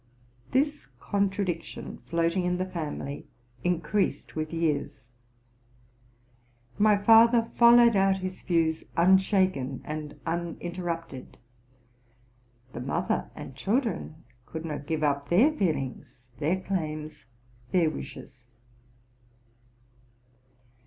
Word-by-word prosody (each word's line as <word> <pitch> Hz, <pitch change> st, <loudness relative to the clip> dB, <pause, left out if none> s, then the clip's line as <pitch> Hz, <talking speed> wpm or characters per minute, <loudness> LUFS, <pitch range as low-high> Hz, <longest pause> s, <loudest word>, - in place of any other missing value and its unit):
This 290 Hz, +3 st, 0 dB
contra 200 Hz, +3 st, 0 dB
cietion 170 Hz, -2 st, -5 dB
floating 170 Hz, +2 st, +1 dB
in 180 Hz, 0 st, 0 dB
the 185 Hz, -, -1 dB
'family 155 Hz, -5 st, -5 dB, 0.4 s
increased 180 Hz, +3 st, -1 dB
with 155 Hz, 0 st, -3 dB
years. 150 Hz, -7 st, -2 dB, 1.7 s
My 210 Hz, 0 st, +5 dB
father 230 Hz, +2 st, +5 dB
followed 235 Hz, -1 st, +7 dB
out 195 Hz, 0 st, +3 dB
his 185 Hz, 0 st, -6 dB
views 165 Hz, -2 st, +1 dB
unshaken 185 Hz, -, +3 dB
and 150 Hz, -1 st, -6 dB
uninterrupted: 170 Hz, -3 st, -4 dB, 1.4 s
the 120 Hz, -, -5 dB
mother 135 Hz, -, -1 dB
and 135 Hz, -, -9 dB
children 210 Hz, -, -2 dB, 0.2 s
could 160 Hz, 0 st, -6 dB
not 150 Hz, -2 st, -5 dB
give 160 Hz, -1 st, -1 dB
up 140 Hz, -1 st, 0 dB
their 225 Hz, -, +5 dB
feelings, 135 Hz, -, -3 dB
their 160 Hz, +5 st, +1 dB
claims, 155 Hz, -8 st, -4 dB, 0.4 s
their 170 Hz, -4 st, +3 dB
wishes. 130 Hz, -4 st, -10 dB
170 Hz, 95 wpm, -27 LUFS, 155-195 Hz, 1.7 s, followed